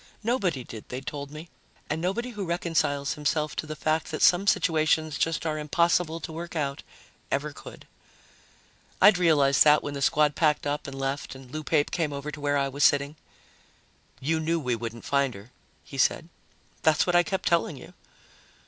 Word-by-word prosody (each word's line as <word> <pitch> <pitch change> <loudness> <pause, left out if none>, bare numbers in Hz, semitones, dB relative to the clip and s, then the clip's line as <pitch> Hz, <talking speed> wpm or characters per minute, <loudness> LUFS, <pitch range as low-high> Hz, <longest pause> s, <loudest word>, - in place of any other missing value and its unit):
Nobody 195 - 0
did, 110 -2 -10
they'd 130 +1 -6
told 140 -1 -5
me, 155 +3 -9 0.4
and 155 +2 -2
nobody 235 +8 -2
who 210 -3 -5
reconciles 165 -5 0
himself 150 0 -1
to 155 - -4
the 155 - -5
fact 155 +1 -1
that 155 - -2
some 185 +3 +5
situations 155 -4 +2
just 165 0 0
are 155 -1 -1
impossible 165 +2 +1
to 160 - -6
work 170 +2 -7
out 140 -3 -2 0.5
ever 145 +2 -2
could. - - -12 1.1
I'd 195 -1 +6
realized 145 -6 +4
that 150 0 +5
when 145 - -4
the 140 - -5
squad 150 +2 +3
packed 150 -3 +2
up 145 0 -2
and 135 -1 -7
left 135 +1 -3
and 130 -1 -13
Lou 155 +2 -5
Pape 150 -1 +1
came 160 -4 -1
over 140 +2 -5
to 150 0 -9
where 145 0 +1
I 140 0 +1
was 140 +1 -2
sitting. 140 +1 +3 1.0
"You 160 +4 0
knew 165 +1 0
we 125 -5 -1
wouldn't 115 0 -7
find 140 -4 +1
her," 100 +5 -13 0.3
he 135 - -9
said. 160 +4 +2 0.5
"That's 160 -1 +3
what 180 - +1
I 175 - +7
kept 185 +2 -3
telling 170 -3 +1
you." 125 - -13
150 Hz, 185 wpm, -26 LUFS, 140-165 Hz, 1.1 s, I